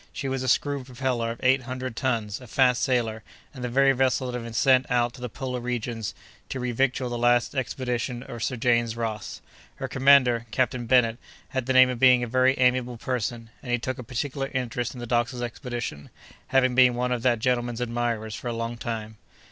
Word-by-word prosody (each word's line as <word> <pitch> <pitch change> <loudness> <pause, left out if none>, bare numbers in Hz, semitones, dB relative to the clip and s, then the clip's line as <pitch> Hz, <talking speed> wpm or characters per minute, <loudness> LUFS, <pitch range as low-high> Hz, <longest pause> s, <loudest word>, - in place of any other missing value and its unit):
She 135 - -5
was 135 -1 -2
a 130 - -3
screw 140 +2 +1
propeller 125 -2 -2
of 115 - -6
eight 130 +1 +4
hundred 130 -1 -5
tons, 115 -4 -2
a 125 - -11
fast 125 +1 +3
sailer, 115 -4 0 0.3
and 130 -3 -8
the 125 - -2
very 135 +3 +4
vessel 130 0 +1
that 125 - -4
had - - -8
been 115 - -7
sent 130 +2 +3
out 120 -1 +1
to 125 - -12
the 125 - -4
polar 125 +2 -4
regions, 120 -3 -3 0.3
to 130 - -4
revictual 125 +1 0
the 120 - -3
last 120 0 +3
expedition 125 -2 -3
of 120 -3 -8
Sir 125 - -1
James 120 -1 +1
Ross. 110 -2 -4 0.3
Her - - -4
commander, 130 -4 +4
Captain 125 0 -1
Bennet, 120 -1 +3 0.3
had 130 -2 -3
the 130 - +2
name 130 0 +7
of 125 - -5
being 125 -1 +6
a - - -2
very 130 +3 +3
amiable 125 -1 +2
person, 115 -1 -3
and 125 - -6
he 120 - +3
took 130 +2 -4
a - - -6
particular 135 +3 -3
interest 120 -1 -2
in - - -8
the 120 - -5
doctor's 120 +1 0
expedition, 120 - -5 0.4
having 130 -1 +3
been 125 -1 +5
one 125 +1 -1
of 125 -2 -1
that 120 -1 +3
gentleman's 120 0 -1
admirers 115 -2 -2
for 115 - -6
a 120 - -1
long 115 +1 -4
time. 110 -2 -5
125 Hz, 210 wpm, -26 LUFS, 120-130 Hz, 0.4 s, name